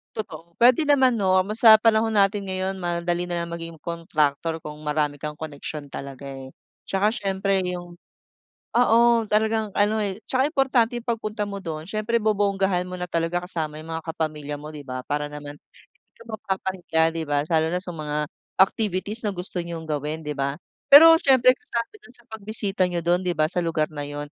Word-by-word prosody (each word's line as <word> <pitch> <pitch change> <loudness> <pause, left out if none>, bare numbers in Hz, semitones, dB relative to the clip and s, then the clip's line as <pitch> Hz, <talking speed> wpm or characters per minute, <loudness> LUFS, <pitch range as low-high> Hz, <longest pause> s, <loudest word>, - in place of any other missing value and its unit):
Totoo. 170 -6 -8
Pwede 245 +5 +5
naman 265 -3 +5
'no, 185 -1 +3
mo 210 - -4
sa 220 -1 +8
panahon 225 0 +3
natin 195 0 +2
ngayon 190 0 -3
madali 175 0 -2
nalang 170 -1 -3
maging 165 -1 -7
kontraktor 160 -1 -1
kung 150 -1 -8
marami 150 -1 -1
kang 150 0 -5
koneksyon 150 -1 -7
talaga, 140 0 -8
eh. 135 -1 -8 0.4
Tsaka 205 +3 +1
siyempre 195 -2 0
yung 175 -1 -6 0.8
oo 235 -1 +4 0.3
talagang 220 0 +1
ano, 210 +2 +2
eh, 200 -2 -2
'tsaka 265 +3 +1
importante 255 -5 +2
pagpunta 215 -3 -2
mo 200 -1 -6
dun 155 -3 -5
s'yempre 215 +4 -1
bobonggahan 195 -4 +1
mo 185 - -6
na 180 - -4
talaga 175 0 -1
kasama 155 -4 -4
yung 160 +1 -8
mga 160 0 -4
kapamilya 150 -2 -3
mo 150 +1 -9
'di 145 -2 -9
ba, 130 0 -5
para 145 0 -2
naman 145 0 -8
hindi - - -27
ka - - -13
mapapahiya 190 -5 -2
,'di 165 -1 -3
ba, 145 0 +1
lalo 160 -1 +2
na 180 - -1
sa 180 - -7
mga 150 -2 -4 0.4
activities 205 +2 +1
na 205 - -1
gusto 180 0 -3
niyong 170 -1 -6
gawin 150 +1 -3
'di 150 - -3
ba. 140 +1 -1 0.4
Pero 325 +3 +11
siyempre 255 -2 +5
kasama 235 - -4
dun 250 - -18
sa 240 - -22
pagbisita 205 -3 -1
niyo 175 -1 -2
dun, 175 +1 +2
'di 175 -2 -1
ba, 155 - +3
sa 180 - 0
lugar 160 -2 0
na 145 -1 -5
yun. 145 0 -5
180 Hz, 185 wpm, -24 LUFS, 155-210 Hz, 0.8 s, Pero